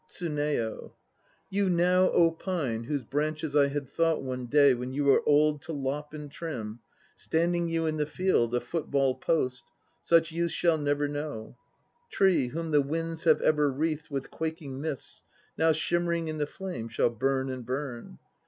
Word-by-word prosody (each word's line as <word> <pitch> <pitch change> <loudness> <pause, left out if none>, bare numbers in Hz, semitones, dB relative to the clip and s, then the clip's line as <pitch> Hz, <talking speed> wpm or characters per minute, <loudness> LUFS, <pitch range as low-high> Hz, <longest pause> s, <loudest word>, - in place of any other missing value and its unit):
TSUNEYO. 150 -9 -2 0.6
You 200 0 +1
now, 175 -1 +4
pine, 155 -10 -3
whose 140 0 -2
branches 150 +3 -2
I 145 -1 +5
had 140 -1 -3
thought 165 +2 +1
One 130 -1 -4
day 140 +1 +5
when 125 +1 -4
you 145 +2 0
were 140 -1 +5
old 150 0 +4
to 165 - -6
lop 145 +1 -3
and 150 -2 -8
trim, 120 -9 -6 0.4
Standing 170 +1 0
you 165 0 0
in 155 -1 -1
the 150 -1 0
field, 150 -10 +1
a 120 - +1
football 140 -1 0
post, 130 -2 -1
1 - - -38 0.3
Such 165 -1 +3
use 170 +1 -1
shall 170 -2 +2
never 145 0 0
know. 145 -6 -5 0.6
Tree, 185 -9 +3
whom 165 +5 -4
the 145 -1 +5
winds 165 +4 -3
have 160 -2 +5
ever 150 -2 +3
wreathed 155 +3 -2
With 135 -2 -4
quaking 160 -4 -5
mists, 150 -3 -5 0.3
now 160 0 +3
shimmering 170 +1 0
in 155 -1 -4
the 145 - 0
flame 160 -12 -6
Shall 115 +1 +1
burn 135 +3 0
and 130 -1 -6
burn. 125 - -5
150 Hz, 170 wpm, -28 LUFS, 135-165 Hz, 0.6 s, I